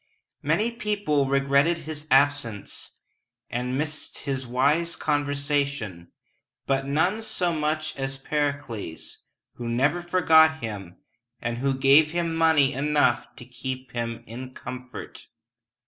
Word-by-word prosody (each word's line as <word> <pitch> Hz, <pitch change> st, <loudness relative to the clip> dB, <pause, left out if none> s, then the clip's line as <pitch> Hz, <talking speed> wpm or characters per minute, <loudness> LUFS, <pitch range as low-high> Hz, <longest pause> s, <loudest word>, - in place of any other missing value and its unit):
Many 225 Hz, +3 st, +1 dB
people 205 Hz, -, 0 dB
regretted 140 Hz, +4 st, +3 dB
his 155 Hz, -1 st, -6 dB
absence, 135 Hz, -6 st, +1 dB, 0.6 s
and 125 Hz, +2 st, -2 dB
missed 150 Hz, +1 st, -3 dB
his 135 Hz, -3 st, -3 dB
wise 145 Hz, +7 st, +2 dB
conversation, 140 Hz, -, -1 dB, 0.5 s
but 135 Hz, 0 st, 0 dB
none 175 Hz, +10 st, +1 dB
so 180 Hz, -5 st, 0 dB
much 155 Hz, 0 st, -1 dB
as 135 Hz, 0 st, -2 dB
Pericles, 140 Hz, -, -3 dB, 0.4 s
who 120 Hz, -1 st, -4 dB
never 140 Hz, +9 st, +1 dB
forgot 160 Hz, -3 st, +5 dB
him, 100 Hz, -, -6 dB, 0.4 s
and 120 Hz, 0 st, -3 dB
who 135 Hz, +1 st, +1 dB
gave 140 Hz, +4 st, +5 dB
him 170 Hz, -1 st, 0 dB
money 160 Hz, -4 st, +4 dB
enough 140 Hz, -3 st, +1 dB
to 120 Hz, -, -10 dB
keep 130 Hz, +1 st, -6 dB
him 115 Hz, -1 st, -4 dB
in 130 Hz, +3 st, -8 dB
comfort. 125 Hz, 0 st, -8 dB
140 Hz, 115 wpm, -25 LUFS, 125-155 Hz, 0.6 s, forgot